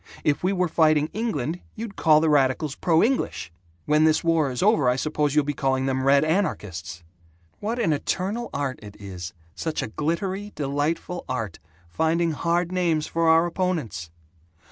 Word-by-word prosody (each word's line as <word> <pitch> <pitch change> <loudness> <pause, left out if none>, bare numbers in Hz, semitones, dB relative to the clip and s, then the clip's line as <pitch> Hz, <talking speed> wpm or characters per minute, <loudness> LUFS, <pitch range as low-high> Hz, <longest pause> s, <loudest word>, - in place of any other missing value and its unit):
If 145 +2 +1
we 185 - +2
were 180 -2 +1
fighting 155 -2 +3
England, 180 - -2 0.2
you'd 220 -2 -6
call 155 -2 +4
the 160 - +2
radicals 140 +1 +2
'pro 165 +1 +2
English.' 250 - -1 0.3
When 150 +1 +3
this 155 0 +3
war 165 -4 +2
is 125 +6 -2
over, 190 - +4
I 125 - +2
suppose 150 +1 -1
you'll 150 - +4
be 145 - -1
calling 135 -2 0
them 130 -1 0
'red 140 +2 +4
anarchists.' 95 - -2 0.6
What 225 +3 -2
an 210 -10 +2
eternal 200 +10 -2
art 140 -2 -3
it 105 -1 -11
is 95 -2 -7 0.2
such 160 -1 -3
a - - -4
glittery 185 - -2
delightful 150 +5 -2
art 115 -8 -3 0.3
finding 160 - +1
hard 170 +4 0
names 170 -4 +1
for 165 0 +1
our 165 +1 +5
opponents! 165 - -2
155 Hz, 165 wpm, -24 LUFS, 135-175 Hz, 0.6 s, our